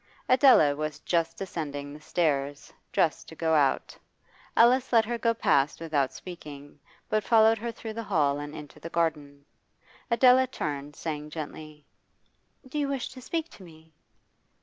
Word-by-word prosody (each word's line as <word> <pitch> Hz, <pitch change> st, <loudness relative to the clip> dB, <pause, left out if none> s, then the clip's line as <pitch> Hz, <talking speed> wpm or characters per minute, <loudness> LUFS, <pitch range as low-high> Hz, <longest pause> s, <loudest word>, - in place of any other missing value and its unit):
Adela 255 Hz, -, +6 dB
was 155 Hz, 0 st, -4 dB
just 170 Hz, -2 st, 0 dB
descending 145 Hz, -6 st, -5 dB
the 150 Hz, -, -12 dB
stairs, 145 Hz, -4 st, -1 dB, 0.2 s
dressed 160 Hz, -, 0 dB
to 160 Hz, -, -11 dB
go 160 Hz, 0 st, 0 dB
out. 145 Hz, -3 st, +1 dB, 0.6 s
Alice 250 Hz, +3 st, +5 dB
let 225 Hz, -2 st, +5 dB
her 235 Hz, +1 st, -3 dB
go 230 Hz, 0 st, +2 dB
past 145 Hz, -10 st, +1 dB
without 150 Hz, -5 st, 0 dB
speaking, 145 Hz, -5 st, -10 dB, 0.3 s
but 215 Hz, -1 st, 0 dB
followed 225 Hz, +1 st, +4 dB
her 235 Hz, +2 st, -3 dB
through 225 Hz, -1 st, -8 dB
the 230 Hz, -, -4 dB
hall 150 Hz, -9 st, +1 dB
and 145 Hz, 0 st, -7 dB
into 150 Hz, 0 st, -10 dB
the 165 Hz, -, -7 dB
garden. 150 Hz, -4 st, -2 dB, 0.6 s
Adela 255 Hz, +2 st, +5 dB
turned, 145 Hz, -, -5 dB
saying 150 Hz, -2 st, -5 dB
gently 155 Hz, -1 st, -8 dB, 0.8 s
'Do 295 Hz, +4 st, -4 dB
you 285 Hz, -, 0 dB
wish 275 Hz, -2 st, -3 dB
to 260 Hz, -1 st, -11 dB
speak 325 Hz, +5 st, -3 dB
to 195 Hz, -, -14 dB
me? 160 Hz, -2 st, -16 dB
160 Hz, 155 wpm, -27 LUFS, 145-230 Hz, 0.8 s, Adela